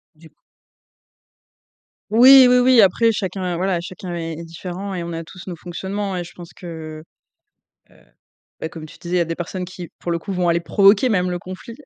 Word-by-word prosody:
Du 160 +1 -17
c - - -35 1.8
Oui, 255 +4 +8
oui, 250 0 +5
oui. 250 -1 +5
Après 215 +4 +4
chacun, 185 -3 -3
voilà, 180 0 0
chacun 180 0 -7
est 165 -1 -4
est 170 - -7
différent 180 +4 -7
et 175 - -4
on 170 0 -6
a 165 0 -5
tous 180 +2 -13
nos 180 -2 -6
fonctionnements. 190 +4 -5
Et 175 - -3
je 170 - -13
pense 175 -1 -12
que, 160 -3 -9 0.9
heu, - - -23 0.6
beh 160 - -4
comme 160 -2 -9
tu - - -14
disais, 175 +1 -4
il - - +3
y - - +3
a - - +1
des 165 0 -4
personnes 180 +1 -5
qui, 180 -1 -9
pour 175 - -4
le 170 - 0
coup, 195 - -6
vont 180 -1 0
aller 170 0 +2
provoquer 200 +7 +4
même 180 -4 +1
le 175 0 -3
conflit, 185 +6 -9
180 Hz, 215 wpm, -20 LUFS, 170-195 Hz, 1.8 s, Oui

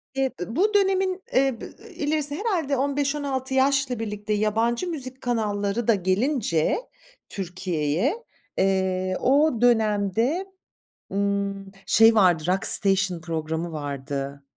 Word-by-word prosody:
E 270 0 +1 0.2
ı 225 +6 -5
bu 410 +7 +2
dönemin 380 -2 +1
e 260 -3 +2
b - - -6
eee, 445 - -14
ilerisi 295 -1 -1
herhâlde 335 - -1
15-16 275 -1 -1
yaşla 270 -2 +2
birlikte 210 -1 -3
yabancı 225 - 0
müzik 265 -6 -5
kanalları 215 -2 -1
da 230 - +5
gelince 190 - 0 0.5
Türkiye'ye, 180 - -2 0.3
eee, 185 -1 0
o 275 -2 +3
dönemde, 225 - +2 0.7
ımm, 200 0 -2
şey 225 0 +5
vardı, 180 -6 +4
Rockstation 190 -1 +3
programı 160 0 -3
vardı 140 -1 -5
220 Hz, 110 wpm, -24 LUFS, 190-275 Hz, 0.7 s, da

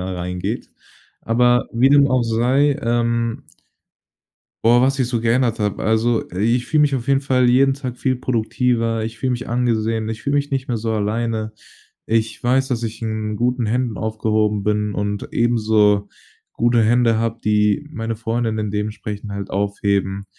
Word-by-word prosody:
reingeht. 90 -1 -4 0.5
Aber 120 +1 +2
wie 120 +3 +4
dem 140 0 +5
auch 130 -2 +2
sei, 130 +6 +2
ähm 115 0 -1 1.2
boah, 120 +2 +5
was 135 +1 +2
ich 125 - +1
so 120 -2 -1
geändert 115 +1 +1
habe. 105 -2 -2
Also, 110 +1 +1
i 110 +7 +1
ich 120 - -3
fühle 155 - +2
mich 145 -2 +3
auf 125 -1 -3
jeden 135 -1 +3
Fall 130 -3 +2
jeden 135 +2 +4
Tag 130 -3 -6
viel 130 -1 0
produktiver, 115 -2 0
ich 115 0 -6
fühle 130 +2 -1
mich 120 0 -4
angesehen, 115 -2 0
ich 110 -1 -5
fühle 140 0 0
mich 145 0 -1
nicht 135 -1 -2
mehr 120 - -1
so 115 +1 -3
alleine. 110 +1 -2 0.5
Ich 115 0 -1
weiß, 130 +2 +2
dass 120 -2 -2
ich 115 0 -5
in 110 -1 -3
guten 125 0 0
Händen 120 0 -1
aufgehoben 110 -1 0
bin 105 0 -1
und 105 0 -3
ebenso 110 -3 +2 0.5
gute 120 0 +2
Hände 115 0 +3
habe, 115 0 -2
die 105 +6 +2
meine 115 -4 -4
Freundin 115 0 -2
in 105 -1 -2
dementsprechend 105 0 -4
halt 100 -1 -5
aufheben. 100 0 -1
115 Hz, 170 wpm, -20 LUFS, 110-125 Hz, 1.2 s, dem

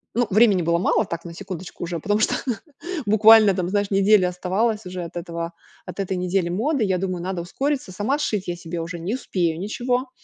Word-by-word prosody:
ну, 245 - +3
времени 205 -4 +5
было 170 +1 +2
мало, 215 +3 +2
так 170 -2 -5
на 170 - -8
секундочку 185 -3 -7
уже, 170 -1 -3
потому 205 +5 0
что 220 - +2 0.7
буквально 215 0 +7
там, 180 -1 -2
знаешь, 205 +1 0
неделя 195 -1 +4
оставалось 200 +4 -1
уже 180 -1 -5
от 170 - -9
этого 170 -1 -5 0.3
от - - -9
этой 190 -1 -1
недели 180 -1 0
моды. 245 - 0
Я 190 -3 +1
думаю, 185 -1 -3
надо 185 -2 -3
ускориться. 270 +2 -2
Сама 210 +10 -1
сшить 210 -9 -2
я 175 - -2
себе 170 0 -5
уже 170 +1 -5
не 185 +7 -3
успею 170 -9 -1
ничего, 245 +5 -1
190 Hz, 200 wpm, -23 LUFS, 175-215 Hz, 0.7 s, буквально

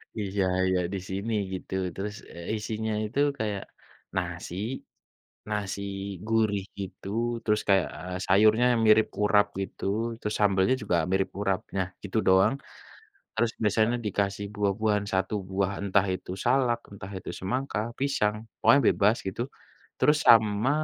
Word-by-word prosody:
Iya 100 -2 -1 0.2
iya, 95 0 +2
di 100 - -2
sini 100 +4 -2 0.2
gitu. 95 - -6 0.2
Terus, 105 +2 -4 0.2
eee, 85 +6 -4
isinya 110 +1 -3
itu 110 +6 -3 0.2
kayak 105 -3 -2 0.5
nasi, 85 - -3 0.9
nasi 100 -2 -2 0.5
gurih 110 -3 +2 0.2
gitu, 95 0 -7 0.3
terus 105 -1 +1
kayak, 95 -3 +4
eee, 90 +2 -6
sayurnya 110 +5 +5 0.2
mirip 110 0 +6
urap 105 0 +4
gitu, 95 - -6 0.4
terus 105 - -2
sambelnya 100 +3 +3
juga 100 -4 +1 0.2
mirip 95 0 +1
urap. 95 -2 +1 0.2
Nah, 95 -1 0
gitu 100 +2 -2
doang. 95 +6 +5 0.8
Terus 115 0 +2
biasanya 110 +3 +2
dikasih 100 0 -1
buah-buahan, 105 0 +1
satu 95 +2 0
buah, 95 0 0
entah 100 0 +3
itu 90 - -8
salak, 125 -1 +3
entah 100 -1 -9
itu - - -7
semangka, 125 +6 -2 0.2
pisang, 105 -7 +1 0.2
pokoknya 140 - +6
bebas 105 +3 +3
gitu. 95 +5 -2 0.6
Terus 150 - +4
sama 110 +1 +5
105 Hz, 135 wpm, -27 LUFS, 95-110 Hz, 0.9 s, mirip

